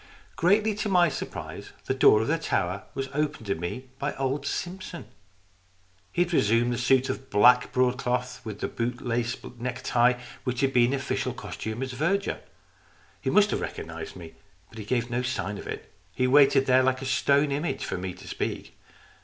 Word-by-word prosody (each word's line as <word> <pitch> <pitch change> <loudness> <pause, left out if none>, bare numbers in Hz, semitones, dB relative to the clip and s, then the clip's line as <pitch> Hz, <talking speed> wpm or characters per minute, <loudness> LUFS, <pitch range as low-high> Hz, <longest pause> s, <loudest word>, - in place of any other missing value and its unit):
Greatly 210 +5 +3
to 210 +1 -3
my 175 -3 +5
surprise 140 - -7
the - - 0
door 110 -4 +5
of - - -3
the 165 +2 +1
tower 100 - -1
was 135 0 -2
opened 150 -5 -1
to 100 - 0
me 85 +10 -5
by 140 0 -2
old 135 +1 -2
Simpson. 180 -1 -5 1.1
He 175 - +3
had 175 0 -6
re - - +5
sumed 115 +3 +2
the 120 - -2
suit 130 +1 +3
of 135 - -5
black 125 +5 +5
broadcloth, 125 0 0
with 105 -2 -7
the - - 0
boot 120 +1 -3
lace 120 0 -1 0.2
neck 125 +1 -4
tie, 125 +1 +3 0.2
which 125 0 -2
had 135 -1 +2
been 120 0 +4
his 140 -1 -1
official - - -2
costume 110 +4 -5
as 130 - -4
verger. 170 +9 0 0.8
He - - -1
must 210 -1 +4
have - - -1
recognized 80 0 -6
me, 85 -3 -10 0.4
but 110 - -11
he 105 - -6
gave 120 +1 -1
no 120 +1 0
sign 105 -5 -3
of - - -9
it. - - -7 0.2
He 125 - +1
waited 135 0 +5
there 130 0 +5
like 130 0 +1
a - - -4
stone 140 +2 +2
image 150 +5 -2
for - - -3
me 90 0 -5
to 95 - -13
speak. - - -4
125 Hz, 195 wpm, -27 LUFS, 115-140 Hz, 1.1 s, my